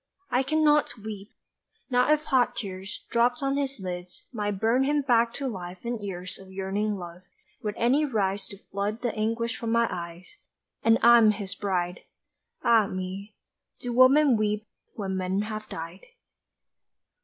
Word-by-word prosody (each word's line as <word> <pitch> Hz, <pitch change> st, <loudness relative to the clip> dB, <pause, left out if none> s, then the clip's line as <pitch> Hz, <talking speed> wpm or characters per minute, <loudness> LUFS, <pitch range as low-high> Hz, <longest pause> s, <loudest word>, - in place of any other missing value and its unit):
I 250 Hz, -, +3 dB
cannot 300 Hz, -2 st, +2 dB
weep! 210 Hz, -1 st, -8 dB, 0.6 s
Not 250 Hz, +3 st, +4 dB
if 305 Hz, 0 st, +3 dB
hot 255 Hz, -5 st, +2 dB
tears, 195 Hz, -1 st, -6 dB
Dropped 240 Hz, +2 st, +2 dB
on 275 Hz, 0 st, +1 dB
his 275 Hz, -3 st, -2 dB
lids, 180 Hz, -1 st, -7 dB
Might 205 Hz, -3 st, -2 dB
burn 230 Hz, +5 st, +3 dB
him 290 Hz, +1 st, +1 dB
back 235 Hz, -3 st, +3 dB
to 275 Hz, -, -3 dB
life 185 Hz, -5 st, -6 dB
and 235 Hz, -2 st, -3 dB
years 185 Hz, -2 st, -6 dB
Of 190 Hz, 0 st, -13 dB
yearning 195 Hz, +2 st, -1 dB
love, 175 Hz, -1 st, -9 dB, 0.4 s
would 210 Hz, -1 st, -3 dB
any 255 Hz, +6 st, +3 dB
rise 205 Hz, -7 st, -1 dB
To 200 Hz, -, -10 dB
flood 205 Hz, +4 st, -4 dB
the 240 Hz, -, 0 dB
anguish 230 Hz, +2 st, -1 dB
from 230 Hz, -1 st, -3 dB
my 235 Hz, 0 st, +3 dB
eyes 175 Hz, -, -8 dB, 0.4 s
And 225 Hz, 0 st, +5 dB
I'm 235 Hz, -2 st, +8 dB
his 200 Hz, -2 st, -2 dB
bride! 180 Hz, -3 st, -2 dB, 0.6 s
Ah 225 Hz, -3 st, +5 dB
me, 190 Hz, +3 st, -6 dB, 0.4 s
do 245 Hz, -1 st, -4 dB
women 260 Hz, +1 st, +6 dB
weep 210 Hz, 0 st, 0 dB, 0.3 s
when 190 Hz, -3 st, -3 dB
men 185 Hz, +2 st, 0 dB
have 215 Hz, 0 st, -6 dB
died? 165 Hz, +3 st, -8 dB
215 Hz, 155 wpm, -27 LUFS, 190-245 Hz, 0.6 s, I'm